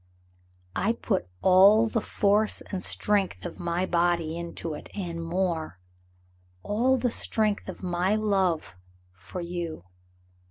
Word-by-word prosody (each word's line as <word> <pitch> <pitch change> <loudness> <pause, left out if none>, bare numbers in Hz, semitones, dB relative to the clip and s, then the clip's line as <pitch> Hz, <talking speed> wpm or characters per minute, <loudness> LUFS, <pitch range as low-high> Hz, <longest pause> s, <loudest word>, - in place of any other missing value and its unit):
"I 210 +5 +1
put 200 - -1 0.2
all 195 +4 +7
the 225 0 -1
force 210 +1 +1
and 190 -2 -2
strength 205 -2 0
of 175 - -7
my 175 +1 -1
body 170 -2 +1
into 170 -1 -5
it, 150 - -9
and 170 -4 -4
more; 165 - -2 0.9
all 245 +6 +2
the 245 -1 0
strength 215 -2 0
of - - -8
my 180 +3 +1
love 190 - 0 0.4
for 95 - -8
you. 170 - -5
185 Hz, 125 wpm, -27 LUFS, 170-210 Hz, 0.9 s, all